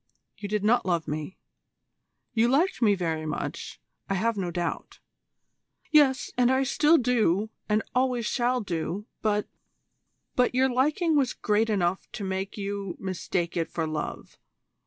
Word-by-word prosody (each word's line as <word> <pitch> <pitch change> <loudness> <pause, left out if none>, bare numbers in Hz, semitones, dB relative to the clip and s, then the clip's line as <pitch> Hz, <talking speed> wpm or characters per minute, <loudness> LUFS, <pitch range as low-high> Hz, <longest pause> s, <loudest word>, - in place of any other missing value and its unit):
You 205 - -7
did 210 -1 -1
not 240 +3 +3
love 170 -3 0
me. 155 +4 -4 1.0
You 230 0 +3
liked 285 +5 +2
me 210 -3 +5
very 160 -4 -2
much, 155 - -5 0.3
I 195 - +1
have 230 +4 +1
no 190 -3 -2
doubt 175 -1 -4 0.5
" - - -41
"Yes, 290 -3 +4
and 245 0 +5
so 260 - +4
I 265 - +2
do - - +1
still, 250 - +3 0.2
and 210 +1 +2
always 250 -2 +1
shall 250 +1 +1
do, 180 +1 -3 0.2
but 210 -1 +1 0.4
" - - -50
"But 250 0 +2
your 260 +1 +4
liking 300 +6 +2
was 270 -4 +2
great 215 +2 +1
enough 190 -3 0
to 205 - -5
make 190 +1 -3
you 200 -2 -4
mistake 180 -2 -2
it 165 -2 -1
for 165 - -2
love. 155 -1 -5
210 Hz, 160 wpm, -27 LUFS, 180-250 Hz, 1.0 s, me